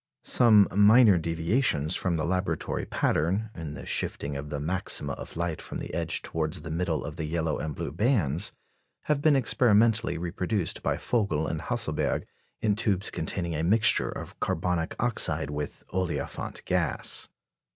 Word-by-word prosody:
Some 110 -5 +6
minor 105 -1 +6
deviations 80 - 0
from 90 -3 -1
the 80 - -1
laboratory 90 +1 -1
pattern, 95 +8 0
in 80 -3 -6
the - - -8
shifting 70 0 -2
of 70 +1 -5
the 75 -1 -3
maxima 85 +6 -1
of - - -8
light 85 -1 -2
from - - -6
the - - -7
edge 80 -2 -2
towards 80 0 -3
the 80 - -6
middle 80 -2 -1
of 75 +1 -7
the 80 - -3
yellow 80 -1 -1
and 75 -2 -4
blue - - -4
bands, 90 - +1 0.5
have 150 -2 0
been 150 -1 +4
experimentally 115 -4 +3
reproduced 90 +2 -2
by - - 0
Vogel 100 -10 0
and - - -3
Hasselberg - - 0 0.4
in 105 -2 +2
tubes 100 -3 +1
containing 85 +1 -2
a 75 - -1
mixture 105 +6 +3
of - - -8
carbonic 85 -1 -1
oxide 110 -11 +2
with 75 -1 -5
olefiant 90 -2 -3
gas. - - 0
85 Hz, 155 wpm, -27 LUFS, 80-105 Hz, 0.5 s, Some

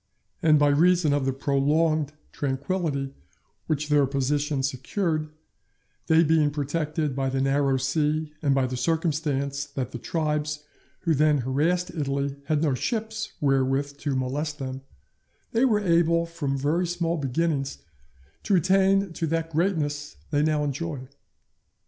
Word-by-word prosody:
And 155 -2 +5
by 145 0 +4
reason 165 +1 +4
of 140 -2 0
the - - +2
prolonged 145 +3 +1 0.2
tranquility 140 0 -2 0.5
which 150 -1 -1
their 145 -2 +4
position 140 +1 0
secured, 155 +4 -1 0.8
they 160 +1 +5
being 155 -1 +3
protected 150 0 -2
by 135 -1 0
the 135 0 -1
narrow 135 0 +2
sea 150 +3 0
and 140 -2 +2
by 135 -1 +2
the 130 0 -3
circumstance 145 -3 0
that 135 -3 -5
the 120 - -6
tribes 150 0 -2 0.4
who 165 -3 +2
then 150 -1 +3
harassed 165 +7 +1
Italy 140 -3 -2
had 155 0 +1
no 145 -4 +2
ships 220 - -3
wherewith 135 0 +1
to 145 -2 -1
molest 145 +4 -2
them, 130 -1 -5 0.7
they 235 +3 +3
were 220 -5 +3
able 170 -3 +3
from 155 -5 -3
very 155 +6 +1
small 170 -1 -1
beginnings 140 -1 -1 0.6
to 200 - +2
attain 190 +1 +3
to 165 - -2
that 165 +1 -1
greatness 150 -4 -1 0.2
they 145 -1 +2
now 150 -1 +1
enjoy. 145 -2 -4
150 Hz, 140 wpm, -26 LUFS, 140-165 Hz, 0.8 s, And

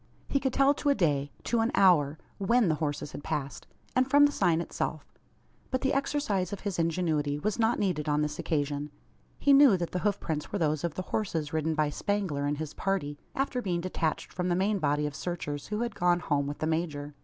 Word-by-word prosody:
He 275 - +1
could 265 -1 0
tell 275 +2 +4
to 290 - -1
a 280 - +4
day 145 - +1
to 235 - 0
an 225 +1 +2
hour 160 -7 +4 0.2
when 220 +1 +3
the - - +3
horses 145 -1 -2
had 145 - -8
passed; 145 -4 -4 0.3
and 255 +1 +3
from 290 +1 +7
the 290 - +2
sign 175 - +2
itself. 155 -2 -4 0.6
But 260 - -1
the 270 - +1
exercise 275 - 0
of 205 - -5
his 200 -4 -3
ingenuity 160 -4 0
was 210 +9 -2
not 225 +1 +3
needed 170 -7 -1
on 150 0 +2
this 150 - -3
occasion. 145 -2 -1 0.5
He 285 - +4
knew 275 -8 +7
that 170 -1 -3
the 180 - -1
hoof 200 +1 0
prints 150 -2 -4
were - - -1
those 155 -4 0
of 170 -3 -2
the 185 - -3
horses 165 -8 -1
ridden 160 0 0
by 150 -1 +1
Spangler 185 -7 -1
and 145 0 -1
his 155 -1 -5
party 160 -7 -2 0.2
after 270 -2 -1
being 175 -5 -1
detached 170 -3 -2
from 180 0 -2
the 175 - +2
main 200 +3 +1
body 150 -1 +1
of 150 - -3
searchers 150 -3 -4
who 210 +1 -2
had 235 -2 -2
gone 175 -2 +2
home 140 -2 0
with 145 - -4
the - - -2
major. 155 -3 -2
170 Hz, 225 wpm, -29 LUFS, 150-210 Hz, 0.6 s, from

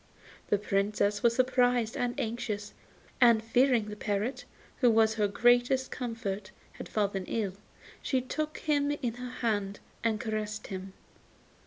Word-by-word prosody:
The 205 - +4
Princess 205 +1 0
was 235 -1 +3
surprised 245 -3 +2
and 245 0 -2
anxious, 215 -2 -3 0.5
and 235 -3 +6
fearing 245 0 +3
the 210 - -6
parrot, 210 +4 -2 0.3
who 245 - +4
was 220 -1 +4
her 210 -2 +1
greatest 245 +5 +3
comfort, 220 -5 -4 0.2
had - - -9
fallen 200 -3 -1
ill, 205 -5 -1 0.5
she 260 - +1
took 305 +4 -3
him 290 -2 +1
in 275 -5 -2
her 250 +1 -7
hand 205 -5 -2 0.2
and 220 -2 +1
caressed 215 -1 -3
him. 190 0 -6
225 Hz, 140 wpm, -30 LUFS, 205-245 Hz, 0.5 s, and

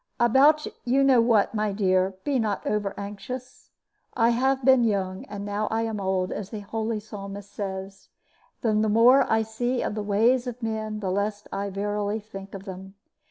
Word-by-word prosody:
"About 280 +6 +5 0.2
you 265 +3 +2
know 265 -3 +5
what, 225 -3 +3
my 210 -1 0
dear, 190 -1 +1
be 280 -3 +1
not 215 -3 -1
overanxious. 210 +4 -5 0.5
I 230 -1 +4
have 265 +2 +1
been 260 -2 +6
young, 195 -4 -1
and 200 -1 -7
now 205 +1 -2
am 225 -1 -1
old, 190 -1 0
as 200 -2 -5
the 215 -2 -6
holy 220 +1 -3
Psalmist 200 -1 -9
says; 195 -1 -6 0.5
and 215 -2 +2
the 220 - +1
more 245 +5 +5
I 220 0 +3
see 240 +3 -2
of - - -2
the 215 - -3
ways 230 +5 +2
of 245 0 -6
men, 215 -1 -3
the 190 -2 -1
less 205 +2 -2
I 200 +1 -2
verily 205 +2 -2
think 195 -2 -10
of 195 0 -9
them. 190 0 -9
215 Hz, 175 wpm, -26 LUFS, 200-235 Hz, 0.5 s, been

